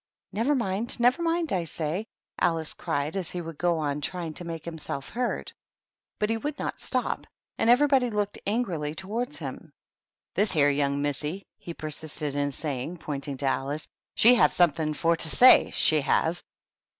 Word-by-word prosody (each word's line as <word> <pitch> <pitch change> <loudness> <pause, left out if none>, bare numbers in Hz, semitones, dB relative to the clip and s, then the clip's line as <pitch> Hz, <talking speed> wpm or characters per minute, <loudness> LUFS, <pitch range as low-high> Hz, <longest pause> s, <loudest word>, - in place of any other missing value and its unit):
"Never 235 +8 +1
mind! 230 +1 0
Never 245 +7 +3
mindy 335 -1 0
I 180 -2 +1
say!" 165 +6 -2 0.3
Alice 165 -2 +1
cried, 145 +5 -2
as 185 -3 0
he 180 - -4
would 165 -3 -7
go 175 -1 +2
on 150 -2 -2
trying 170 +1 -4
to 175 - -4
make 165 -2 -6
himself 160 -4 -5
heard. 245 +1 -3 0.6
But 210 +1 0
he 225 - +1
would 290 +5 -4
not - - -4
stop, - - -1 0.3
and 225 - +2
everybody 265 0 +4
looked 205 -2 -2
angrily 175 -9 -1
towards 225 - -4
him. - - -7 0.3
" - - -67
This 210 -1 +2
here 145 -3 +4
young 140 0 0
missy," 150 +6 -3
he 170 - -8
persisted 155 -1 -3
in 145 0 0
say 140 -2 -3
ing, 170 +7 -5
pointing 140 -3 -4
to 140 - -3
Alice, 135 +3 -1 0.3
"she 240 +3 +7
have 245 - +5
something 155 -3 +2
for 170 +1 +2
to 165 -1 -2
say, 255 +10 +7
she 155 -1 +3
have." 160 +5 +1
165 Hz, 175 wpm, -27 LUFS, 150-220 Hz, 0.6 s, she